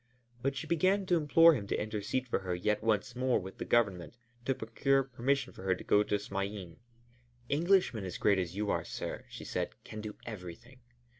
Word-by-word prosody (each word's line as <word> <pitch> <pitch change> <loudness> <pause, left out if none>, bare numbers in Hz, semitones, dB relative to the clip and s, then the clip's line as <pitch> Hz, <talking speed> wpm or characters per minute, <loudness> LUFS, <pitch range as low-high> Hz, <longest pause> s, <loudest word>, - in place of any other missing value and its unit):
But 135 +2 0
she - - -4
began 185 +4 +2
to 180 - +3
implore 165 +1 +6
him 105 -8 -3
to - - -1
intercede 110 +4 -2
for 115 - 0
her 95 -2 -2
yet 105 +4 0
once 110 +2 0
more 130 0 +2
with 95 0 -7
the - - -3
Government, 100 -2 +1 0.3
to 135 - +1
procure 135 +5 +1
permission 135 +2 -1
for - - -11
her 95 -1 +1
to - - -10
go 105 - +4
to 105 0 +1
Smain. 100 -3 -5 0.7
"Englishmen 165 - +3
as 90 -2 -5
great 100 -2 +3
as 90 -1 -3
you 105 0 0
are, - - 0
sir," - - -5
she - - -9
said, - - -3
"can 110 - -7
do 105 -1 -6
everything. 115 +5 -9
110 Hz, 200 wpm, -32 LUFS, 100-135 Hz, 0.7 s, implore